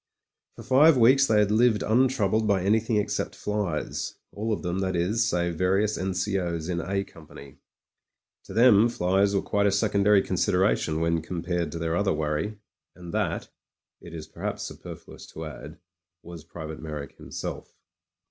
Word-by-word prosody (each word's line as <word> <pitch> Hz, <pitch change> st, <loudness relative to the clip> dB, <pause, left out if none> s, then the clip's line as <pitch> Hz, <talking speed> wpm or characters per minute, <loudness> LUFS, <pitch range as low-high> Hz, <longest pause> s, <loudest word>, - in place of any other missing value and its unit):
For 115 Hz, -, -10 dB
five 135 Hz, +5 st, +5 dB
weeks 130 Hz, +3 st, +5 dB
they 110 Hz, -, +3 dB
had 105 Hz, -1 st, +3 dB
lived 110 Hz, 0 st, +3 dB
untroubled 110 Hz, -3 st, +2 dB
by 100 Hz, -3 st, +2 dB
any 105 Hz, +3 st, +3 dB
thing 115 Hz, 0 st, -2 dB
except 105 Hz, -1 st, -1 dB
flies 105 Hz, -7 st, -3 dB
— -, -, -28 dB
^all 110 Hz, +2 st, -2 dB
of 105 Hz, -, -2 dB
them, 90 Hz, +1 st, -2 dB
that 95 Hz, -1 st, -1 dB
is, 105 Hz, +7 st, +1 dB
save 85 Hz, -1 st, -1 dB
various 95 Hz, +3 st, +2 dB
N.C.O.'s 90 Hz, -3 st, -2 dB
in 85 Hz, -2 st, -1 dB
A 95 Hz, +3 st, -2 dB
company. 70 Hz, -6 st, -14 dB, 0.9 s
To -, -, -10 dB
them 115 Hz, -1 st, +6 dB
flies 100 Hz, -1 st, +1 dB
were 100 Hz, -, +1 dB
quite 100 Hz, 0 st, +1 dB
a -, -, +3 dB
secondary 100 Hz, 0 st, +3 dB
consideration 90 Hz, -3 st, +1 dB
when 85 Hz, 0 st, +1 dB
compared 85 Hz, -1 st, -3 dB
to -, -, -4 dB
their 80 Hz, 0 st, -1 dB
other 100 Hz, +2 st, +1 dB
worry. 75 Hz, +7 st, -2 dB, 0.4 s
And 85 Hz, -2 st, -10 dB
that, -, -, -2 dB, 0.5 s
it 85 Hz, -1 st, -10 dB
is 80 Hz, -, -7 dB
perhaps -, -, -5 dB
superfluous -, -, -10 dB
to 80 Hz, -, -6 dB
add, 75 Hz, +1 st, -9 dB, 0.5 s
was 85 Hz, -2 st, -10 dB
Private 80 Hz, -2 st, -8 dB
Me)rrick 75 Hz, -3 st, -7 dB
himself. -, -, -7 dB
95 Hz, 165 wpm, -26 LUFS, 85-105 Hz, 0.9 s, them